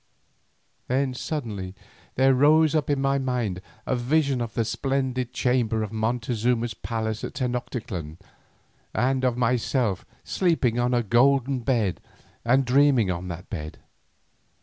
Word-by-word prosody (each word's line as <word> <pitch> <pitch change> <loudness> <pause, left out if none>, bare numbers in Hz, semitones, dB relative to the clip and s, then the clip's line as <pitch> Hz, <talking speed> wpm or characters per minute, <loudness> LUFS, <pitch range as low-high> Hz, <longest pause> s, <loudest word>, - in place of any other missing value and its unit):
Then 130 +1 0
suddenly 110 -10 -4 0.4
there 135 +1 +4
rose 155 +4 +5
up 155 -3 0
in 145 -1 +1
my 135 0 +1
mind 120 -8 -2 0.2
a 130 - 0
vision 135 +1 +1
of 115 -1 -4
the 115 -2 +1
splendid 130 0 -1
chamber 120 -4 +1
in 105 +1 -6
Montezuma's 115 +1 0
palace 110 -1 -3
in - - -2
Tenoctitlan, 115 - -4 0.8
and 130 +3 +1
of 125 -2 +1
myself 120 -3 0 0.2
sleeping 150 -10 +1
on 125 +1 +2
a 120 - +2
golden 135 +4 +3
bed, 115 -6 0 0.4
and 130 +3 +3
dreaming 130 -5 +4
on 90 +1 -4
that 90 +2 -7
bed. 75 -6 -6
125 Hz, 130 wpm, -25 LUFS, 110-135 Hz, 0.8 s, rose